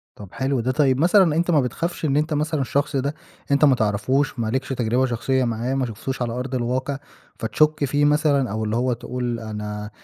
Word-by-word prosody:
طّب 100 -3 -11
حلو 135 -1 -1
ده. 125 +3 0
طيب 130 -1 +2
مثلًاً 175 -1 +4
أنت 170 +2 +1
ما 150 -4 +4
بتخافش 160 +7 -3
إن 140 0 +2
أنت 155 +1 0
مثلًاً 150 0 0
الشخص 140 +2 -1
ده 140 +3 -1 0.4
أنت 140 +2 +5
ما 135 - +5
تعرفوش، 120 +5 0
ما 115 - -1
لكش 130 +4 -2
تجربة 125 0 +1
شخصية 130 +2 0
معاه، 120 +2 -1
ما 135 -1 0
شفتوش 125 +3 -5
على 120 -1 -1
أرض 130 +1 -4
الواقع، 130 +3 -1 0.4
فتشك 150 +6 +2
فيه 145 +2 +1
مثلًاً 145 -5 +2
أو 110 +1 -2
اللي 110 +1 -1
هو 125 +1 +1
تقول 120 0 -4
أنا 105 -1 -5
130 Hz, 205 wpm, -22 LUFS, 120-145 Hz, 0.4 s, أنت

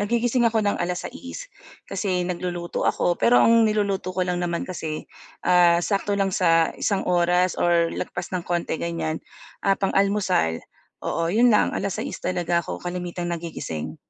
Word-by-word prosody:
nagigising 235 +3 +1
ako 225 -1 +1
ng 205 - +1
alas-6:00 255 - -5 0.4
kasi 185 -3 -1
nagluluto 175 -1 -3
ako. 175 - +1
Pero 245 - +5
ang 230 0 +5
niluluto 200 -3 -1
ko 185 - -2
lang 180 -1 -1
naman 170 -1 -2
kasi, 160 -4 -5 0.4
ah, 175 -1 +5
sakto 200 +2 -1
lang 195 -1 +1
sa 165 -4 +3
1 200 -2 0
oras 180 +1 +2
or 170 -1 +3
lagpas 175 +1 -5
ng 175 - -5
konti 175 -2 -1
ganyan, 165 -2 -2 0.4
ah, 195 0 +3
pang-almusal, 195 - +1 0.4
oo 165 0 -1
'yon 235 +4 +5
lang, 210 - +3
6:00 200 -3 -3
talaga 175 -1 0
ako - - -6
kalimitang 175 0 -4
nagigising. 160 - -5
180 Hz, 150 wpm, -24 LUFS, 170-200 Hz, 0.4 s, Pero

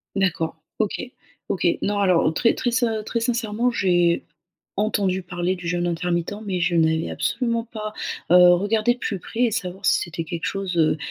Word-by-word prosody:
D'accord. 180 -5 0 0.2
OK. 215 -2 0 0.5
OK. 175 - +1
Non 205 0 0
alors, 180 -5 +3
très 230 +8 +3
très 245 - -1
ser 230 -3 +1
très 230 - -1
sincèrement, 235 0 0
j'ai 175 -5 +2 0.5
entendu 195 -3 0
parler 175 +1 -2
du 180 -1 -9
jeûne 175 0 0
intermittent, 175 +2 -1
mais 185 -3 -1
je 175 0 +1
n'avais 160 0 +2
absolument 230 -2 -1
pas, 215 -1 -5 0.4
heu, 180 0 +8
regardé 215 +5 +2
de 245 - -17
plus 200 -4 -3
près, 225 +6 -7
et 240 - +4
savoir 190 -3 -4
si - - +4
c'était 170 -2 -4
quelque 165 +1 -5
chose, 195 -2 -3
heu 155 -1 +3
190 Hz, 180 wpm, -23 LUFS, 175-220 Hz, 0.5 s, heu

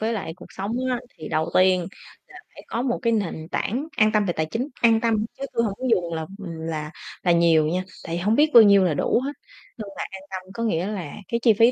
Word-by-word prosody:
với 225 +2 0
lại 190 -7 -4
cuộc - - -12
sống 195 +3 -5 0.2
á 245 - -1 0.2
thì 155 - -7
đầu 160 0 -1
tiên 185 0 +5 0.5
là - - -11
phải - - -12
có 230 - -2
một 250 -2 -1
cái 230 -1 +2
nền 170 -7 -2
tảng 265 +9 -2
an 215 0 +4
tâm 215 -1 +2
về 175 - 0
tài 155 -1 -1
chính, 230 - -3
an 225 -1 +5
tâm 220 -2 +1
chứ 275 - -4
tui 230 - +2
hông 210 -4 -1
có 260 - -5
dùng 175 -5 +1
làm, 160 -1 -4
ừm, 170 -5 -7
là 155 -2 -4 0.3
là 175 - +3
nhiều 165 -2 +4
nha, 180 +3 -1 0.2
tại 170 +1 -3
hông 205 +6 +1
biết 300 +1 +4
bao 235 - +10
nhiêu 200 -2 +6
là 175 -4 +2
đủ 230 - +1
hết, 280 - -2 0.5
nhưng 215 -2 -6
mà - - -2
an 190 0 -9
tâm 185 0 -7
có 230 - -4
nghĩa 185 -4 0
là 185 -8 -5
cái 235 - -1
chi 225 -3 +6
phí 230 +4 +5
200 Hz, 260 wpm, -24 LUFS, 170-230 Hz, 0.5 s, bao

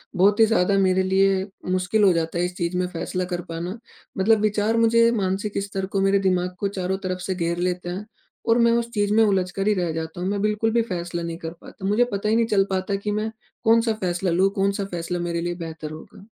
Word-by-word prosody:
बहुत 200 +4 +4
ही 225 - +8
ज़्यादा 200 -3 +2
मेरे 190 -1 +3
लिए 190 0 +2 0.3
मुश्किल 185 +3 +1
हो 190 - +6
जाता 165 +1 -1
है 175 - +2
इस 180 0 -5
चीज़ 175 +1 -1
में 180 - +1
फैसला 180 +1 -3
कर 175 - -2
पाना। 175 +6 -4 0.4
मतलब 215 +3 +3
विचार 215 +1 +1
मुझे 230 0 +5
मानसिक 200 -1 -1
स्तर 195 -1 -3
को, 195 0 -1
मेरे 195 0 +3
दिमाग 180 -1 0
को 200 - 0
चारों 190 -1 -2
तरफ 185 0 -2
से 190 +1 -2
घेर 170 -1 -1
लेते 180 0 -2
हैं 190 +4 -5 0.4
और 230 - +5
मैं 235 0 +5
उस 235 0 0
चीज 205 -1 +1
में 225 +1 +5
उलझकर 195 -1 0
ही 210 - +4
रह 170 - -1
जाता 160 +2 -5
हूँ। 185 - -1
मैं 200 0 -1
बिल्कुल 210 +1 +1
भी 235 - +4
फैसला 175 -5 -4
नहीं 165 0 -4
कर 165 0 -5
पाता। 190 - -10
मुझे 210 +4 +3
पता 200 +1 -1
ही 220 - +3
नहीं 230 0 +3
चल 195 -3 +3
पाता 190 +1 -1
कि 205 +1 -3
मैं 215 +1 -1 0.3
कौन-सा 225 0 +4
फैसला 180 -3 -1
लूँ, 190 +3 +3
कौन-सा 200 0 0
फैसला 175 -1 -4
मेरे 170 -1 -2
लिए 175 0 -2
बेहतर 160 -2 -7
होगा? 160 +5 -12
190 Hz, 235 wpm, -23 LUFS, 180-210 Hz, 0.4 s, ही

